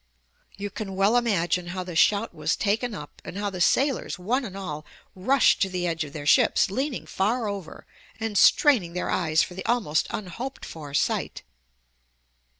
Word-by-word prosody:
You 200 0 -5
can 195 -2 -6
well 200 +4 +3
imagine 180 -7 +1
how 185 +1 -4
the 180 -2 -8
shout 205 +5 +3
was 155 +1 -1
taken 220 +3 -1
up, 150 - -10
and 185 - -8
how 205 0 -2
the 180 -2 -5
sailors, 270 +6 +2
one 235 +10 -1
and 195 -3 -7
all, 155 -6 -5 0.3
rushed 255 +9 +3
to 195 - +2
the 180 -1 -2
edge 165 -1 -1
of 145 - -8
their 145 -1 -7
ships, 155 - +4
leaning 265 +4 -2
far 220 +4 0
over 200 -5 -6 0.3
and 220 -1 -3
straining 200 - +5
their 180 - -2
eyes 160 -3 +2
for - - -6
the 190 - -6
almost 220 -11 +1
unhoped 225 +7 -6
for 145 -3 -8
sight. - - -1
195 Hz, 175 wpm, -25 LUFS, 175-225 Hz, 0.3 s, straining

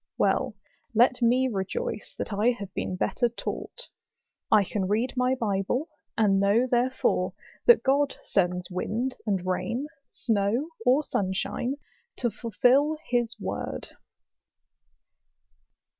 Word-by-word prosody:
Well, - - +1 0.4
let 245 +2 +4
me 250 +2 +4
rejoice 255 - -3
that - - -4
I 210 +4 +3
have 200 -4 -8
been 185 - -2
better 240 +6 +1
taught: 235 - -5 0.6
I 215 -2 +6
can 190 0 -2
read 225 +6 0
my 250 +1 +2
Bible, 225 - -1 0.3
and 200 -3 +4
know 200 +5 +4
therefore 245 -7 +1 0.3
that 475 - +7
God 280 +1 +2
sends 180 -1 0
wind 230 +8 -2
and 190 -3 0
rain, 230 +8 -1 0.2
snow 225 +6 0 0.2
or 265 +5 +5
sunshine, 200 +5 -1 0.4
to 240 -2 -1
fulfil 250 +8 +2
his 240 -2 0
word. - - -4
235 Hz, 115 wpm, -27 LUFS, 200-255 Hz, 0.6 s, that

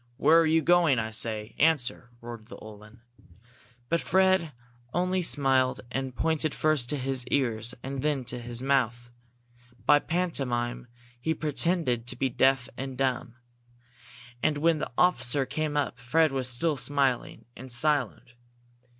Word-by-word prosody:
"Where 155 +4 +5
are 165 - +3
you 160 0 +2
going, 170 -4 +4
I 110 -1 -2
say? 110 0 -3
Answer!" 145 -6 +1
roared 115 -2 -9
the - - -10
Uhlan. 105 +2 -13 0.9
But 170 +3 0
Fred 190 -3 +2 0.4
only 180 +1 +1
smiled 135 -5 +2
and 130 -1 -4
pointed 160 -2 0
first 155 -6 +1
to 150 - -1
his 130 -1 -2
ears 120 -3 0
and 135 0 -4
then 145 -3 -1
to 125 +1 -5
his 120 +1 -5
mouth. 120 -3 0 0.7
By 145 0 +6
pantomime 125 -9 -2 0.3
he 160 +6 -1
pretended 150 -5 -1
to 125 - -2
be 135 +2 0
deaf 130 0 +2
and 135 0 -6
dumb. 130 -2 -1 1.1
And 150 - +1
when 160 +1 +2
the - - -4
officer 135 -6 +2
came 155 +1 -2
up, 130 -4 -1
Fred 155 +5 +2
was 130 -2 0
still 145 +5 0
smiling 135 0 0
and 130 +1 -9
silent. 125 -2 0
135 Hz, 145 wpm, -27 LUFS, 120-155 Hz, 1.1 s, By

